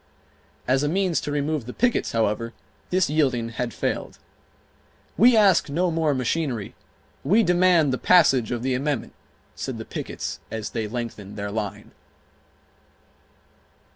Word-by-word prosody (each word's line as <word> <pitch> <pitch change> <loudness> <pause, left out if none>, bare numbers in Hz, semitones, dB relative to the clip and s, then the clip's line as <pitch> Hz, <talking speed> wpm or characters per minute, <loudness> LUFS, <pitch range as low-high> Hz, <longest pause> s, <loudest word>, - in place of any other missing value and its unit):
As 130 +2 +3
a 145 - 0
means 185 0 +1
to 145 - -4
remove 145 -3 -1
the 125 - -6
pickets, 245 -1 +1
however, 115 +1 -1 0.4
this 185 0 +2
yielding 130 -6 +1
had 115 +1 -3
failed. - - -3 1.0
"We 240 +1 +6
ask 195 -8 +4
no 175 +5 0
more 160 -3 +1
machinery; 130 -4 -2 0.5
we 205 +11 +4
demand 175 -5 +3
the 130 - -2
passage 135 -10 +4
of 120 -1 -3
the 130 0 0
amendment," 140 0 -2 0.4
said - - -5
the - - -7
pickets - - -5
as 110 -1 -5
they 110 -2 -3
lengthened 105 -3 -6
their 100 0 -4
line. 105 -2 -5
135 Hz, 140 wpm, -24 LUFS, 115-170 Hz, 1.0 s, We